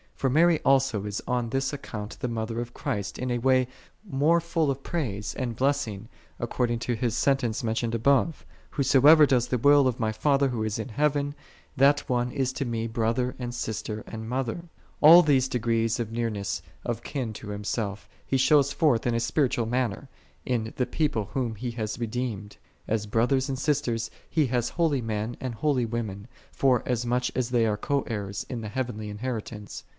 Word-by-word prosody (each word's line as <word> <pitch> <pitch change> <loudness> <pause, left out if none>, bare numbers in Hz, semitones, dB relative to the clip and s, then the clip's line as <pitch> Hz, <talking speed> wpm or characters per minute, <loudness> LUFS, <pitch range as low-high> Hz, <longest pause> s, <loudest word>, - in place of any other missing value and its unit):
For 135 - 0
Mary 165 +2 +4
also 135 -7 +2
is 105 -1 -3
on 120 -2 0
this 135 +3 -1
account 105 -7 -7
the 125 - -2
Mother 115 0 -3
of 120 0 -8
Christ 100 -2 -3
in 125 0 -2
a 120 - 0
way 130 0 +3 0.4
more 155 +3 +3
full 165 -2 0
of 135 0 -2
praise 110 - -3
and 120 -3 -3
blessing, 115 -6 -1 0.3
according 120 -1 -1
to 120 +1 -1
His 115 0 -1
sentence 130 -6 +1
mentioned 115 +1 -1
above. 140 +6 +2 0.3
"Whosoever 145 +3 +6
doeth 125 -3 +1
the 125 - +1
will 145 +2 +5
of 125 -2 -1
my 110 -2 +1
Father 140 +5 +2
Who 115 -3 -2
is 110 -1 -2
in 115 +4 -5
heaven, 145 +2 0 0.4
that 140 +1 +4
one 125 0 0
is 130 0 -1
to 135 - -3
Me 115 -2 -2
brother, 115 +2 -1
and 120 -1 -4
sister, 110 -2 -4
and 110 0 -7
mother." 130 +4 -2 0.4
All 165 +4 +10
these 135 -4 +3
degrees 115 -2 0
of 115 -2 -3
nearness 110 -4 -2 0.2
of - - -2
kin 125 -6 -3
to 105 - -9
Himself, 105 0 -3 0.2
He 135 - +1
shows 140 +1 +4
forth 130 -8 +2
in 120 - +1
a - - +1
spiritual 120 -1 +1
manner, 125 +1 -1 0.4
in 115 -3 -1
the 125 - 0
People 140 -6 0
whom 120 -4 -1
He 120 +3 -4
hath 110 -2 -4
redeemed: 115 -3 -4 0.3
as 105 -1 -1
brothers 130 +5 +1
and 135 - -2
sisters 130 -5 -1 0.2
He 155 -4 +2
hath 120 -1 0
holy 160 -6 +1
men 110 +1 -3
and 125 -3 -4
holy 135 -1 +1
women, 110 -3 -4 0.2
forasmuch 125 -1 +1
as 125 -2 0
they 120 -2 +2
all 110 - +1
are - - -3
co 140 +5 0
heirs 100 -3 -4
in 120 -3 -4
the 110 - -5
heavenly 115 -3 -4
inheritance. 105 -1 -5
120 Hz, 185 wpm, -27 LUFS, 110-135 Hz, 0.4 s, All